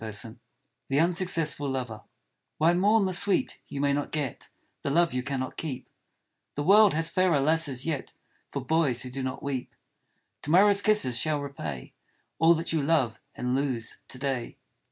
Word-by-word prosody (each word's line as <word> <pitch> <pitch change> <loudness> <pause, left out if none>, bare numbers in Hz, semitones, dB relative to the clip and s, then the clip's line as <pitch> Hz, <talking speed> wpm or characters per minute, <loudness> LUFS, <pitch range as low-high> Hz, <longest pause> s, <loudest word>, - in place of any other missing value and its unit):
84 110 +1 -3 0.5
THE 135 - 0
UNSUCCESSFUL 165 -4 +1
LOVER 125 -5 -4 0.6
WHY 165 +2 +4
mourn 200 +4 +3
the 185 - -1
sweet 195 +1 +1
you 140 - -6
may 140 0 +2
not 145 0 -2
get, 145 -5 -4 0.3
The - - -2
love 170 +2 +2
you 125 - -1
cannot 130 0 -4
keep? 145 -6 -5 0.7
The 145 - -2
world 205 +1 +6
has 165 +1 +3
fairer 185 -5 +2
lasses 145 -3 +1
yet 155 -5 -3 0.4
For 140 -2 -5
boys 145 -5 +1
who 125 - -7
do 135 +2 -5
not 130 +3 -4
weep. 135 -3 -4 0.7
To - - -6
morrow's 200 +4 +5
kisses 200 - +2
shall 155 -2 0
repay 80 - -6 0.5
All 165 +1 +6
that 165 +1 -2
you 160 - +1
love 140 -7 +1
and 125 0 -2
lose 130 -5 -2
to 130 - -7
day. 130 -3 -3
145 Hz, 170 wpm, -27 LUFS, 130-165 Hz, 0.7 s, world